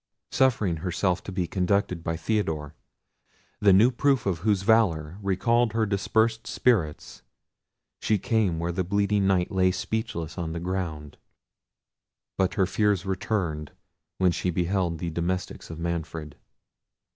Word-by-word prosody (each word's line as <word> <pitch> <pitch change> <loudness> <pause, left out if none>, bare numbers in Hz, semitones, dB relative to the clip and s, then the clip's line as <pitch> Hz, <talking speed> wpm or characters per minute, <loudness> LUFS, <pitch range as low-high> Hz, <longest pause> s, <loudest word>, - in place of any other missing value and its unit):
Suffering 110 -10 +2
herself 90 +2 -1
to - - -5
be 90 -1 -1
conducted 90 -1 0
by 80 0 -2
Theodore, 80 -6 -2 0.9
the 105 -1 +5
new 105 +7 +6
proof 135 0 +1
of 90 -4 0
whose 100 0 +1
valour 95 -6 +2
recalled 115 +4 +1
her 110 -1 +2
dispersed 110 +3 0
spirits, 90 -12 0 0.8
she 105 - +1
came 100 -4 +1
where 85 +1 -2
the 95 +2 -1
bleeding 100 +1 +1
Knight 90 -2 +1
lay 95 -1 +3
speechless 90 -3 -3
on 80 -2 -3
the 85 - -4
ground. 85 -5 -4 1.2
But 95 -1 0
her 95 -4 +3
fears 100 0 +1
returned 90 -6 -2 0.4
when 90 -2 +3
she 90 - -2
beheld 90 0 0
the 85 +1 -4
domestics 90 +3 -3
of 80 - -7
Manfred. 80 -3 -4
95 Hz, 135 wpm, -26 LUFS, 85-105 Hz, 1.2 s, new